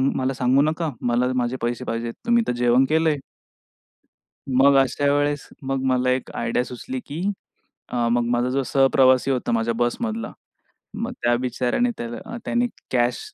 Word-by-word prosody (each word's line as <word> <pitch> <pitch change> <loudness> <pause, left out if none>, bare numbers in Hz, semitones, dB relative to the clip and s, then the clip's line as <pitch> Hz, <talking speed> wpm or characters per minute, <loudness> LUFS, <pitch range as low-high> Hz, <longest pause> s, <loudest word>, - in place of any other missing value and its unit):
मला 130 +1 0
सांगू 130 +1 +3
नका. 155 +1 0
मला 125 +1 +1
माझे 125 0 -1
पैसे 120 +2 -2
पाहिजेत. 115 0 -3
तुम्ही 235 0 +3
तर - - +1
जेवण 120 +2 +3
केलंय." 160 -1 +2 1.3
मग 135 +2 +5
अशा 135 +2 +2
वेळेस, 145 0 0
मग 135 0 -2
मला 125 -1 +2
एक 130 0 -1
आयडिया 115 +1 0
सुचली, 255 - -6
की 150 +3 -6 0.7
अ 120 -1 0
मग 120 0 +2
माझा 120 +1 +1
जो 135 +1 0
सहप्रवासी 135 -1 +4
होता, 130 -3 -1
माझ्या 115 0 +1
बस 120 0 0
मधला, 225 -1 -3 0.6
मग 230 +3 -4
त्या 120 0 +3
बिचाऱ्याने 125 - 0
त्याला 120 - -6
त्याने 240 +1 +1 0.2
कॅश 120 -1 +1
130 Hz, 155 wpm, -23 LUFS, 120-145 Hz, 1.3 s, मग